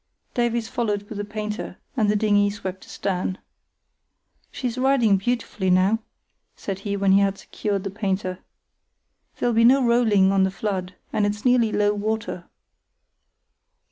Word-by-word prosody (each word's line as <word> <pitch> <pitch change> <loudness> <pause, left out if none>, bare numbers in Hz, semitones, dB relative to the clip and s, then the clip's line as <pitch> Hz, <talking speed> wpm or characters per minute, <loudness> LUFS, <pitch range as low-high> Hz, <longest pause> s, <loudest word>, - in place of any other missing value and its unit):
Davies 235 -2 0
followed 210 -4 -1
with 210 -1 -7
the - - -1
painter, 210 -2 -5 0.2
and 220 -5 +2
the 210 - +2
dinghy 205 -1 +3
swept 190 -2 -6
astern. 185 -1 -2 1.1
"She's 245 -3 -4
riding 255 -6 +3
beautifully 205 -2 -2
now," 185 +4 +3 0.6
said 195 -1 -5
he, 200 0 -3
when 195 -1 +2
he 195 - +6
had 195 0 +1
secured 200 -1 -3
the 195 - -4
painter. 190 -2 -2 1.0
"There'll 240 - +1
be 230 +1 +4
no 260 +2 +5
rolling 220 -5 +4
on 195 -1 +3
the 190 - +2
flood, 190 -1 -3 0.2
and 210 - +1
it's 205 +2 -4
nearly 245 -3 +4
low 205 0 +2
water." 210 -4 -3
205 Hz, 145 wpm, -23 LUFS, 195-225 Hz, 1.1 s, he